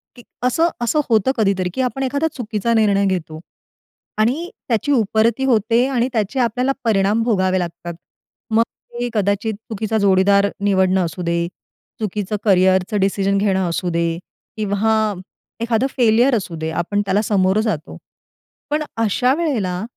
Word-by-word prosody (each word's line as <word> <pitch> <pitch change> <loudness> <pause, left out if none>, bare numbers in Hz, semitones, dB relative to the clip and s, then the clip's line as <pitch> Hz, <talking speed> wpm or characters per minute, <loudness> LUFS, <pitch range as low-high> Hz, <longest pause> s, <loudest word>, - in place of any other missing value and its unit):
की 245 - -14 0.2
असं 290 +7 +2
असं 240 +6 +1
होतं 225 +2 +3
कधीतरी, 195 -4 +1
की 260 - -1
आपण 260 +1 -2
एखादा 280 +4 0
चुकीचा 230 -2 -2
निर्णय 205 -3 +3
घेतो 170 -5 -2 0.8
आणि 260 +11 0 0.2
त्याची 230 +5 0
उपरती 225 0 +2
होते 230 0 +2
आणि 250 -2 0
त्याचे 220 +3 -1
आपल्याला 250 +2 +1
परिणाम 210 0 +2
भोगावे 185 -5 +1
लागतात. 175 0 -5 0.6
मग 225 +1 +4 0.3
ते 240 0 -3
कदाचित 210 +1 0 0.2
चुकीचा 220 0 -2
जोडीदार 200 0 +4 0.2
निवडणं 190 -2 +2
असू 165 +2 -6
दे, 170 0 0 0.5
चुकीचं 210 -1 -3
करियरचं 190 0 +3
डिसिजन 195 0 +1
घेणं 190 -3 +1
असू 175 +2 -2
दे 170 -1 -1 0.4
किंवा 215 +1 +1 0.5
एखादं 235 +2 +1
फेलियर 240 +2 +4
असू 185 -5 -3
दे, 160 0 -4
आपण 205 +5 -1
त्याला 195 +2 +1
समोरं 200 -1 +2
जातो. 170 -9 -3 0.7
पण 305 +1 0
अशा 230 +4 +2
वेळेला 215 - -1
210 Hz, 140 wpm, -19 LUFS, 190-235 Hz, 0.8 s, मग